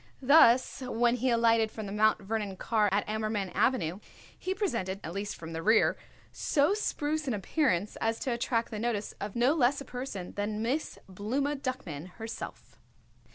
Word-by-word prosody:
Thus 260 -2 +5
when 240 -1 +1
he 255 +2 +1
alighted 230 -1 +3
from 220 0 -7
the 195 - -6
Mount 215 0 +2
Vernon 205 -2 -3
car 215 -1 +2
at 200 +1 +1
Ammerman 215 -3 -2
Avenue 185 -8 +1 0.4
he 375 +1 -3
presented, 230 - -2
at 165 - -5
least 200 +1 -3
from 165 0 -8
the 165 - -3
rear, 220 +6 +4 0.4
so 290 +5 +2
spruce 310 -7 -1
an 250 - 0
appearance 210 - 0
as 225 0 0
to 260 - -1
attract 235 0 -1
the 215 - -4
notice 220 -3 -2
of 205 0 -5
no 245 +4 +4
less 275 -3 +2
a 275 - -7
person 245 -8 -6
than 210 +1 -2
Miss 270 +7 -2
Blooma 245 +10 -1
Duckman 185 - -5
herself. 225 0 -8
225 Hz, 170 wpm, -30 LUFS, 205-255 Hz, 0.4 s, Thus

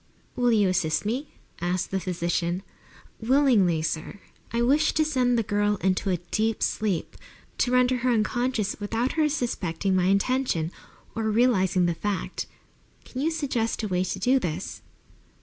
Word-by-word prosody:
"Will 245 -1 +2
you 210 -3 +4
assist 180 -1 0
me?" 260 +8 -2 0.3
asked 175 +1 -1
the 195 - 0
physician. 175 0 -1 0.6
"Willingly, 225 - +3
sir." 160 +5 -3 0.3
"I 235 0 +1
wish 290 +6 +3
to 310 - +2
send 250 -5 +2
the 230 - +2
girl 205 0 +1
into 190 0 0
a 180 - +1
deep 215 +6 -1
sleep, 200 -6 -1 0.4
to 245 - +2
render 250 0 +3
her 250 +1 0
unconscious 235 -1 0
without 225 +5 -1
her 310 -2 +2
suspecting 195 - -1
my 180 -1 +2
intention, 195 -4 +1 0.4
or 220 -1 -1
realizing 195 -6 +3
the 170 - +1
fact. 200 +3 -3 0.6
Can 260 - -5
you 310 - +2
suggest 260 -9 -1
a - - 0
way 180 -2 0
to 190 - -3
do 255 +8 +3
this?" 175 -4 -4
215 Hz, 155 wpm, -26 LUFS, 185-250 Hz, 0.6 s, you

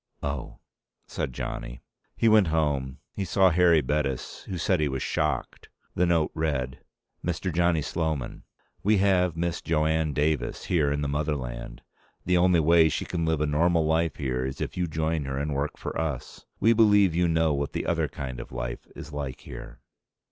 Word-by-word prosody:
"Oh," 70 -2 -4 0.5
said - - -3
Johnny. - - -6 0.3
He 115 - +2
went 110 -4 +6
home. 70 -5 0 0.2
He 100 - -3
saw 95 +1 +4
Harry 85 -1 +5
Bettis, 70 -1 -2
who 95 - -4
said 90 +1 +1
he 75 - +2
was 65 -2 -2
shocked. - - -2 0.2
The 90 - +2
note 85 -3 +2
read: 70 -5 -2 0.4
Mr. 90 +1 -2
Johnny 85 -2 +2
Sloman: 80 -6 -2 0.4
We 105 +1 +3
have 90 -3 +2
Miss 85 0 -1
Jo 75 -1 +1
Anne 80 -1 +1
Davis 75 +1 -1
here 75 -5 +2
in 75 0 -1
the 75 - -1
motherland. 70 -5 -3 0.4
The 90 0 +3
only 90 -1 +4
way 80 0 +5
she - - -2
can 85 -2 -2
live 80 -2 +1
a - - +3
normal 80 +2 +2
life 80 0 +1
here 65 -3 -2
is 65 +1 -4
if - - -4
you 90 -1 0
join 80 -1 -1
her 65 0 -3
and 75 +1 -2
work 70 +2 -2
for - - -5
us. 70 -6 -5
We 115 +2 +5
believe 105 -5 +5
you 85 +1 +2
know 80 -2 +2
what 70 -1 -2
the - - -2
other - - +1
kind 65 -3 -6
of - - -9
life - - -5
is 75 - -9
like 70 -3 -5
here. - - -10
80 Hz, 185 wpm, -27 LUFS, 70-85 Hz, 0.5 s, went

